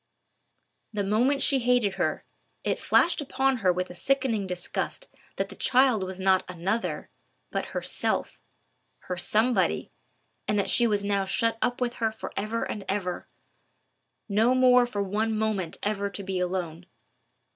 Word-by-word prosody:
The 210 Hz, -2 st, -2 dB
moment 245 Hz, +8 st, +2 dB
she 275 Hz, -2 st, +4 dB
hated 245 Hz, -5 st, +2 dB
her, -, -, -2 dB, 0.4 s
it -, -, -1 dB
flashed 345 Hz, -2 st, +3 dB
upon 270 Hz, -1 st, +1 dB
her 190 Hz, -5 st, +3 dB
with 180 Hz, +1 st, -3 dB
a -, -, -8 dB
sickening 230 Hz, +1 st, 0 dB
disgust 180 Hz, -, -4 dB, 0.3 s
that -, -, -2 dB
the -, -, -9 dB
child 255 Hz, -4 st, +3 dB
was 190 Hz, 0 st, -5 dB
not 190 Hz, 0 st, +3 dB
another, 185 Hz, +6 st, -2 dB, 0.4 s
but -, -, -2 dB
her -, -, -5 dB
Self, -, -, -1 dB, 0.6 s
her 180 Hz, -, -4 dB
Somebody, 220 Hz, +7 st, +1 dB, 0.6 s
and 210 Hz, -, +1 dB
that 200 Hz, -, +1 dB
she 240 Hz, -, +4 dB
was 205 Hz, -2 st, 0 dB
now 200 Hz, -1 st, 0 dB
shut 225 Hz, +3 st, 0 dB
up 245 Hz, 0 st, 0 dB
with 245 Hz, -1 st, -1 dB
her 225 Hz, -1 st, +2 dB
for 220 Hz, -, -8 dB
ever 215 Hz, +3 st, -2 dB
and 205 Hz, -, -4 dB
ever—no 205 Hz, +4 st, -3 dB
more 250 Hz, -1 st, +5 dB
for 205 Hz, -4 st, -2 dB
one 215 Hz, +3 st, -1 dB
moment 215 Hz, -6 st, -1 dB
ever 200 Hz, -1 st, -1 dB
to 200 Hz, 0 st, -6 dB
be 190 Hz, -1 st, -2 dB
alone. 180 Hz, -1 st, -3 dB
210 Hz, 155 wpm, -27 LUFS, 190-245 Hz, 0.6 s, more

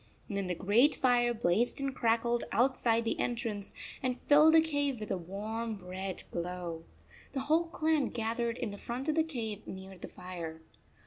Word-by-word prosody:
Then 200 Hz, -4 st, -2 dB
the 180 Hz, -, -1 dB
great 225 Hz, -, +4 dB
fire 245 Hz, -2 st, +3 dB
blazed 230 Hz, +2 st, +1 dB
and 275 Hz, -1 st, -1 dB
crackled 235 Hz, +1 st, +1 dB
outside 235 Hz, 0 st, +2 dB
the 225 Hz, -, -1 dB
entrance 225 Hz, -4 st, -2 dB, 0.3 s
and 255 Hz, -1 st, -1 dB
filled 305 Hz, +2 st, +6 dB
the -, -, +9 dB
cave 285 Hz, -5 st, 0 dB
with 215 Hz, -, -5 dB
a 190 Hz, -, +1 dB
warm 210 Hz, +3 st, -4 dB
red 185 Hz, +1 st, -4 dB
glow. 170 Hz, -1 st, -4 dB, 0.5 s
The 270 Hz, -, -1 dB
whole 315 Hz, +5 st, +2 dB
clan 315 Hz, -4 st, +1 dB
gathered 230 Hz, +1 st, -1 dB
in 235 Hz, -5 st, -3 dB
the 200 Hz, -, -8 dB
front 255 Hz, +5 st, -4 dB
of -, -, +3 dB
the 320 Hz, -, +3 dB
cave 225 Hz, -9 st, -4 dB
near 190 Hz, 0 st, -8 dB
the -, -, -6 dB
fire. 170 Hz, -3 st, -7 dB
230 Hz, 175 wpm, -32 LUFS, 195-265 Hz, 0.5 s, the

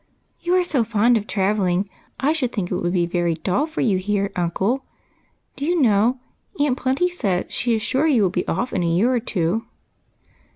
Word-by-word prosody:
" -, -, -45 dB
You 355 Hz, +1 st, +1 dB
are 365 Hz, -, +4 dB
so 280 Hz, -8 st, +1 dB
fond 230 Hz, +2 st, +3 dB
of 215 Hz, -1 st, -1 dB
travelling, 195 Hz, -1 st, +1 dB, 0.3 s
I 290 Hz, +3 st, +2 dB
should 265 Hz, -7 st, -1 dB
think 185 Hz, -5 st, -3 dB
it -, -, 0 dB
would 175 Hz, -1 st, -1 dB
be 175 Hz, -2 st, +1 dB
very 175 Hz, -1 st, 0 dB
dull 190 Hz, -, 0 dB
for 320 Hz, -, -4 dB
you 200 Hz, -6 st, +2 dB
here, 200 Hz, +1 st, -1 dB
uncle. 190 Hz, +9 st, 0 dB, 0.7 s
Do 280 Hz, -, -6 dB
you 345 Hz, +3 st, +1 dB
know. 230 Hz, 0 st, +3 dB, 0.4 s
Aunt 285 Hz, -3 st, +2 dB
Plenty 265 Hz, +7 st, +1 dB
says 200 Hz, -, -1 dB
she 240 Hz, -2 st, +1 dB
is 220 Hz, -, -2 dB
sure 280 Hz, +5 st, +1 dB
you 255 Hz, -9 st, +3 dB
will 185 Hz, -, +2 dB
be 180 Hz, -1 st, -2 dB
off 245 Hz, +1 st, -2 dB
in 185 Hz, -, 0 dB
a 170 Hz, -, 0 dB
year 190 Hz, +10 st, +2 dB
or 245 Hz, -, +2 dB
tw^o." 195 Hz, -2 st, -1 dB
215 Hz, 210 wpm, -22 LUFS, 185-260 Hz, 0.7 s, are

